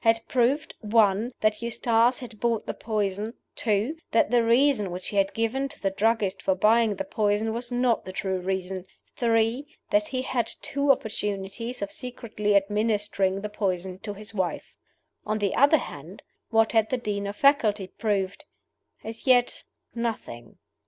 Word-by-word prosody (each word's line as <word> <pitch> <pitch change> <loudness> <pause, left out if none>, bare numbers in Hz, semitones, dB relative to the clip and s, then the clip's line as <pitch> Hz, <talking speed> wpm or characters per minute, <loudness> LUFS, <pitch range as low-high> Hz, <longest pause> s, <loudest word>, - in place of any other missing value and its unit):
had 225 -1 +4
proved 265 +5 +1
(1) 215 +1 +2
that 215 0 +1
Eustace 235 +1 +2
had 230 -4 -9
bought 230 -2 0
the - - -3
poison; 210 -1 -2 0.2
(2) 220 +6 +1
that 230 - +2
the 240 -1 +4
reason 235 -3 +3
which 180 +1 -5
he 205 - -4
had 195 0 +3
given 250 +5 0
to - - -14
the 195 - 0
druggists 205 -1 +1
for 190 - +1
buying 220 +2 +3
the 290 - -3
poison 220 -6 0
was 240 +1 -4
not 245 -2 +1
the 185 - -7
true 190 0 -2
reason; 185 0 -3 0.3
(3) 230 +2 +2 0.3
that 315 0 +3
he 260 -3 -2
had 245 -3 -1
had - - -6
two 280 0 +2
opportunities 210 0 -3
of 200 - -4
secretly 220 -5 -2
administering 205 -1 +1
the 210 - -3
poison 190 -3 -2
to 205 0 -6
his 210 +1 -10
wife. 190 -4 -3 0.5
On 215 0 -1
the 205 -2 0
other 285 +4 +5
side, 165 - -9 0.3
what 225 -1 +3
had 220 -1 +3
the 255 - 0
Dean 205 -4 -3
of 200 - -5
Faculty 220 -7 +3
proved? 195 0 -2 0.6
As 225 +4 -8
yet 245 -1 +3 0.3
nothing. 220 - -5
220 Hz, 165 wpm, -26 LUFS, 200-235 Hz, 0.6 s, other